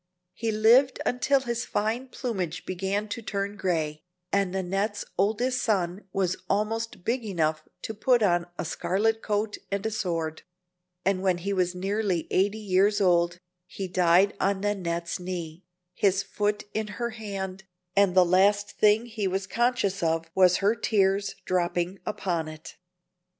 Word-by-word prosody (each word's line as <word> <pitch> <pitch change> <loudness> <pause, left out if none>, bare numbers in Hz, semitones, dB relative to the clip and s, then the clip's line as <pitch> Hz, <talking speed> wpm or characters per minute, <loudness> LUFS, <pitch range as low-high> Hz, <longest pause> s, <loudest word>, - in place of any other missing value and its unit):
He 225 +3 -2
lived 235 +5 +5
until 265 +2 +2
his 235 -2 -2
fine 225 +5 -1
plumage 190 - -4
began 195 +3 -2
to 235 +3 -4
turn 200 -1 -3
gray, 155 -6 -1 0.3
and 200 -2 +1
Nannette's 195 +3 -2
oldest 230 +6 +1
son 190 -3 0
was 185 -1 0
almost 215 -1 -1
big 240 +4 0
enough 160 -6 -1 0.2
to 220 - -4
put 235 +2 +3
on 175 -3 +2
a - - -3
scarlet 200 +7 0
coat 210 0 -1
and 200 +1 -2
a 220 - 0
sword; 165 -7 -2 0.6
and 190 -1 +2
when 185 -2 +2
he 195 +3 -2
was 180 -1 0
nearly 195 -2 -1
eighty 200 +3 +2
years 205 0 +2
old 175 -2 +3 0.3
he 190 +1 -5
died 180 +2 +4
on 195 0 +1
Nannette's 175 -5 -2
knee, 175 -1 -6 0.3
his 195 +1 +2
foot 210 0 -1
in 215 0 -1
her 235 -1 -2
hand, 195 -3 -6 0.3
and 200 -2 +4
the 185 -1 +7
last 200 +3 +3
thing 215 +2 +3
he 220 -4 -3
was 190 +1 -1
conscious 225 -1 0
of 165 0 0
was 185 -1 +5
her 210 - +5
tears 200 -3 +1
dropping 180 +1 0
upon 170 -6 -2
it. 155 0 -10
195 Hz, 150 wpm, -27 LUFS, 180-215 Hz, 0.6 s, the